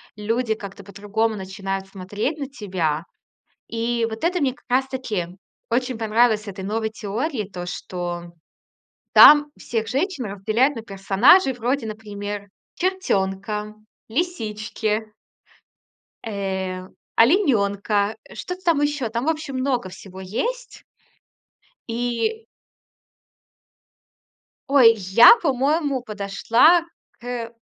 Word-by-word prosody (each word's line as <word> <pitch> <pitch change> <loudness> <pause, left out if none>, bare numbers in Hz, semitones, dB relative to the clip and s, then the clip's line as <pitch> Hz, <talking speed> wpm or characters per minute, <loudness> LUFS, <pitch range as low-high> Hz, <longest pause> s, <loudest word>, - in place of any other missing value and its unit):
люди 220 +2 -1
как-то 200 -2 -9
по-другому 210 +3 -2
начинают 195 0 -5
смотреть 205 - -4
на 280 - -4
тебя. 180 - -2 0.6
И 230 0 -1
вот 220 0 -7
это 355 +1 +1
мне 265 -3 +1
как 290 - -25
раз 265 +2 +2
таки 225 -10 -3 0.4
очень 250 +1 -1
понравилось 220 -1 +2
с - - -15
этой 195 -1 -7
новой 220 +3 -2
теории, 220 - -3
то, 180 -3 -7
что 175 -1 -5 0.8
там 295 0 +9
всех 225 -2 -3
женщин 280 - -1
разделяют 215 +8 +1
на 230 - -5
персонажей 220 - +4
вроде, 245 +1 -1
например: 205 -1 -6 0.3
чертёнка, 210 - -1 0.3
лисички... 220 - -2 1.1
э, 190 -3 -3 0.3
оленёнка, 210 - +2 0.2
что-то 360 +1 -6
там 330 -4 +2
ещё. 290 -5 0
Там, 235 +3 -3
в - - +2
общем, 310 -4 -3
много 255 -6 -1
всего 190 0 -11
есть. 470 - -4 1.0
И... 245 - -2 2.2
Ой, 250 -5 +7
я, 200 - +7
по-моему, 285 - 0
подошла 225 - +3 0.4
кэ 235 -1 -5
225 Hz, 105 wpm, -22 LUFS, 200-265 Hz, 2.2 s, там